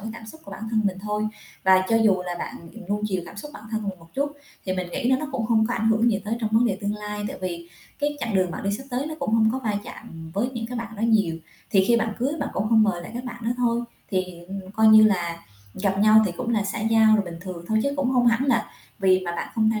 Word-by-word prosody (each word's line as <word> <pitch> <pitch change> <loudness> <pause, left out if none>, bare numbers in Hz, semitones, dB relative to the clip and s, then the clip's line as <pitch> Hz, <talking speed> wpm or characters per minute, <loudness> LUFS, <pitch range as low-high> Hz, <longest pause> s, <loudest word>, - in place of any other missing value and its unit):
cái 220 - -6
cảm 230 -1 -10
xúc 315 +9 -12
của - - -11
bản 200 - -8
thân 220 -1 +2
mình 190 -2 0
thôi. 210 +1 -1 0.4
Và 190 0 +6
cho 225 - +4
dù 205 -5 +3
là 175 - -2
bạn, - - -5 0.2
ừm, 225 -5 -11
nuông 205 +1 -1
chiều 185 -3 -1
cảm 165 - -11
xúc 295 +8 -7
của - - -9
bản 215 - -15
thân 220 -1 -2
mình 185 -2 -5
một 165 0 -19
chút 285 +1 -1 0.3
thì 185 - -1
mình 185 -1 -3
nghĩ 260 +4 -2
nó 260 - +5
nó 305 - -4
cũng 235 -5 -1
hông 220 -2 +3
có 240 - -1
ảnh 220 - +1
hưởng 225 +2 +3
gì 200 - 0
tới 220 +2 -1
trong 220 -2 -1
vấn 230 +2 +4
đề - - -1
tương 205 +1 -1
lai, 210 0 -5
tại - - -7
vì 170 -2 -4 0.3
cái 295 0 -1
chặng 230 -5 -2
đường 185 -2 +2
bạn - - -6
đi 200 - +1
sắp 245 +6 -5
tới 255 +4 -1
nó 315 - -4
cũng 275 -6 0
hông 220 -1 +4
có 260 - -1
va 220 -5 -2
chạm 160 -1 -10
với 210 +6 +1
những 235 -3 -4
cái 245 +1 -5
bạn 225 -1 -6
đó 210 - -5
nhiều. 205 -8 +2 0.3
Thì 190 -1 +4
khi 235 - +5
bạn 225 -1 0
cưới 260 +4 0
bạn - - -1
cũng 200 - -1
hông 225 -1 +5
mời 180 -5 0
lại 175 - -9
các 245 +1 -5
bạn 240 -2 -7
đó 230 - 0
thôi, 240 -1 +1 0.3
thì, 185 -2 +1 0.2
ừm, 190 -1 -7
coi 220 +1 +3
như 215 0 +9
là 175 -5 +1 0.4
gặp 195 0 0
nhau 215 +1 +7
thì 185 - -2
cũng 250 -2 -3
là 215 -3 +1
xã 200 +3 -3
giao 220 0 +5
rồi 205 - 0
bình 170 -2 -7
thường 180 -2 -7
thôi 220 0 +2
chứ 280 - 0
cũng 275 -3 +1
hông 250 -2 +3
hẳn 235 +2 +3
là 240 -4 +1 0.3
vì 190 -2 +4
mà 175 - -2
bạn - - -3
không 220 -1 +3
tham 220 -1 -1
220 Hz, 305 wpm, -24 LUFS, 195-235 Hz, 0.4 s, như